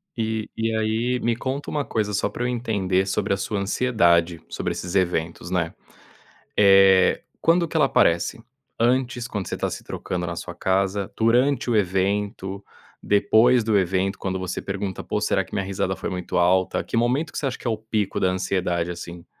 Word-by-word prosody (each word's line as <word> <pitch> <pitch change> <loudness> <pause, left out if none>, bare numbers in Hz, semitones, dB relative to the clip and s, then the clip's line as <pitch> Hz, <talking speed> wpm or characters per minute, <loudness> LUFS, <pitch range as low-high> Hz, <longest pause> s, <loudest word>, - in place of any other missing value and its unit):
E 110 -1 -2
e 115 0 -1
aí 110 +3 0
me 120 -1 0
conta 130 +4 -4
uma 145 -1 -1
coisa, 105 -2 -1
só 100 - 0
pra 120 - -5
eu - - +1
entender 100 -6 0
sobre 95 - 0
a - - 0
sua 100 +1 -2
ansiedade, 90 -6 +2
sobre - - -3
esses 90 +2 -5
eventos, 85 -2 -1
né. 85 -3 0 0.8
Eh, 95 -2 +6 0.2
quando 170 +1 +3
que 160 - -3
ela 150 - +5
aparece? 85 -2 +2 0.4
Antes, 125 0 +1
quando 100 -6 -4
você - - -4
tá - - -1
se - - -7
trocando 90 -1 -4
na 85 0 -4
sua 85 +1 -7
casa? 95 +2 0
Durante 120 +3 +2
o 120 - +2
evento? 100 0 -1 0.4
Depois 110 +4 +4
do 110 -1 +2
evento, 95 +1 0
quando 95 -1 -3
você 90 -1 -4
pergunta: 95 -1 -4
“Pô, - - -2
será - - +1
que - - -19
minha 95 - -1
risada 95 -1 -2
foi - - -4
muito 90 -1 -3
alta?”. 90 +1 +2
Que - - -3
momento 130 +7 +1
que - - -7
você 145 - -2
acha 130 - -2
que - - -7
é - - +2
o 110 - -1
pico 110 -2 -2
da 95 - +2
ansiedade, 90 -2 -1
assim? 85 0 -8
100 Hz, 190 wpm, -23 LUFS, 95-115 Hz, 0.8 s, Eh